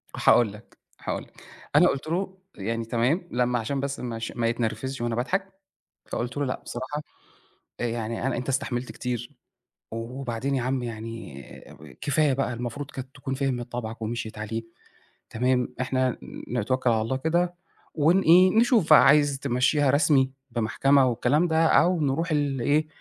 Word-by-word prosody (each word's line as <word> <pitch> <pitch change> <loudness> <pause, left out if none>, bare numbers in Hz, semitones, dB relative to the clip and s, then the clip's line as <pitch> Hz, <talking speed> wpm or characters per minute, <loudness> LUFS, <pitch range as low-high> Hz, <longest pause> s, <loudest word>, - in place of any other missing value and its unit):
هاقول 110 -4 +4
لك، 105 - -16 0.2
هاقول - - -3
لك. - - -19 0.3
أنا 175 +5 +7
قُلت 140 +3 -2
له 190 +3 -2 0.2
يعني 115 +3 -3
تمام 125 +10 0
لمّا 125 0 +1
عشان 135 +5 -2
بس 140 0 -3
مش 115 -2 -4
ما 115 -1 0
يتنرفزش 120 +3 -2
وأنا 120 -1 -1
باضحك، 190 - -2 0.5
فقُلت 125 +4 -4
له: 145 - 0
"لأ 125 - -3
بصراحة 130 +5 -4 0.8
آآ 120 - -1
يعني 115 +1 -3
أنا 135 - -1
أنت 125 +3 -4
استحملت 130 -2 -2
كتير، 120 -1 -4 0.6
وبعدين 120 +3 -3
يا 130 - 0
عم 130 0 -1
يعني 115 - -7 0.6
كفاية 145 0 +2
بقى 130 -1 -1
المفروض 125 +4 -5
كانت 130 -1 -7
تكون 135 0 -4
فهمِت 130 -3 -2
طبعَك 115 -1 -5
ومشْيِت 110 -1 -4
عليه،" 110 +1 -3 0.7
تمام؟ 125 +1 0
"إحنا 130 -1 0 0.3
نتوكّل 130 +4 0
على 110 -1 +2
الله 125 +4 -1
كده 175 +4 0 0.4
ونإيه 175 +3 +5
نشوف 225 - +4
عايز 145 -2 +6
تمشيها 135 +3 +2
رسمي 140 -2 +3 0.2
بمحكمة 130 +4 +3
والكلام 130 +8 +2
ده 160 0 +3
أو 175 +1 +4
نروح 155 +4 0
لإيه 145 +1 +1
130 Hz, 150 wpm, -26 LUFS, 120-145 Hz, 0.8 s, أنا